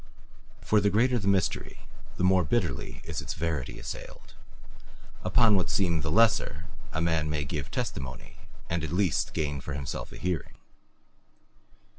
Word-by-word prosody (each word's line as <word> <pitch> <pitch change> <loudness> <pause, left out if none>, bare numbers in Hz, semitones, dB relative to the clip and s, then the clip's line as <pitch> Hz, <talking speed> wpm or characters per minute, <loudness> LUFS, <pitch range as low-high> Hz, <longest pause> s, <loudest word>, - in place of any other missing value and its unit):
For 105 -1 +3
the 100 - +3
greater 120 +5 +3
the 100 - -3
mystery, 95 -3 0 0.4
the - - -1
more 90 0 +5
bitterly 70 - -1
is - - -3
its - - -5
verity 80 -5 -2
assailed; - - -8 0.9
upon 115 -3 +5
what 95 - +1
seem 85 -5 +2
the 80 - -2
lesser 85 -5 +3 0.3
a 80 - -2
man 80 -2 +1
may 75 -1 -1
give 70 -1 -4
testimony 65 -2 -5 0.3
and 85 -1 -1
at 80 - -3
least 90 -1 +1
gain 75 -2 -1
for 70 +2 -5
himself 70 -1 -4
a - - -9
hearing. 90 -2 -2
85 Hz, 150 wpm, -28 LUFS, 75-100 Hz, 0.9 s, more